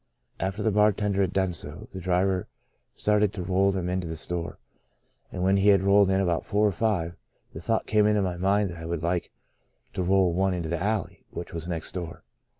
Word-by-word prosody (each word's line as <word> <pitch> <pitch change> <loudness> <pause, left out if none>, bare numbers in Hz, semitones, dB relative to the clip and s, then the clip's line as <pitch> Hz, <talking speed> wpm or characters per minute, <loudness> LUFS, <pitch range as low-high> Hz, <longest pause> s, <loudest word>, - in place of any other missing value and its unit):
After 95 +3 -2
the 110 - +2
bar 105 +1 +4
tender 100 -1 0
had 95 -2 +1
done 95 -2 0
so, 85 +6 -8
the 95 - -5
driver 90 +1 +1 0.5
started 105 -1 +2
to 95 - -4
roll 95 +2 +2
them 95 -2 -2
into 90 -1 -2
the 80 - -4
store, 85 +2 -4 0.7
and 90 - -3
when 95 +1 +3
he 100 +1 +2
had 100 -2 +5
rolled 100 0 +5
in 95 0 +2
about 85 -4 +1
four 105 +1 +1
or - - +1
five, 90 -3 -1 0.4
the 80 - -7
thought 110 +5 0
came 105 -1 +3
into 105 -1 +2
my 90 -2 -1
mind 100 +1 +1
that 85 - -8
I 80 - -7
would 85 -1 -3
like 85 +1 -1 0.6
to - - -2
roll 95 -1 +3
one 95 +1 +1
into 85 -2 -3
the 85 0 -2
alley, 105 -2 -2
which 85 - -7
was 85 0 -5
next 85 -3 -4
door. 85 -2 -6
95 Hz, 220 wpm, -26 LUFS, 85-100 Hz, 0.7 s, had